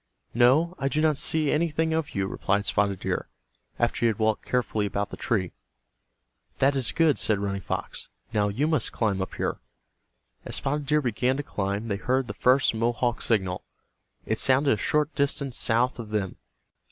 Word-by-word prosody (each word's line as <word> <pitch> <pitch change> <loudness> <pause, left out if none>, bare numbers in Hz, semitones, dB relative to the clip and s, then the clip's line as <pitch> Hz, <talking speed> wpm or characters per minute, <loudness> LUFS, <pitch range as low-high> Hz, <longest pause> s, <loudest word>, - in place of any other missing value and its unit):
"No, 135 +9 +4
I 135 - 0
do 150 +2 0
not 155 -2 +2
see 155 -3 +2
anything 160 0 0
of 160 -2 -2
you," 100 -1 0
replied 100 +1 -1
Spotted 100 -2 0
Deer, - - -2 0.5
after 120 0 0
he - - +1
had 110 -3 0
walked 110 -1 0
carefully 110 -4 -1
about 100 +1 -3
the - - -5
tree. 95 -6 -1 1.1
"That 140 +1 +3
is 130 -3 +4
good," 160 -4 +2
said 110 - +1
Running 100 -1 -3
Fox. - - -5 0.2
"Now 105 -2 +2
you 120 +9 0
must 155 -1 0
climb 100 -4 -1
up 95 - -5
here." - - -2 0.8
As - - -6
Spotted 145 +1 -2
Deer 150 0 +2
began 125 +2 0
to 145 - -3
climb 100 -2 -3
they 100 -3 -1
heard 130 +5 0
the - - -5
first 130 +1 +3
Mohawk 120 +1 0
signal. 95 -5 0 0.6
It 110 - -1
sounded 135 +1 +3
a - - -1
short 150 +8 0
distance 140 -2 0
south 120 +2 +2
of 110 -2 -7
them. 105 -3 -2
120 Hz, 180 wpm, -26 LUFS, 105-140 Hz, 1.1 s, No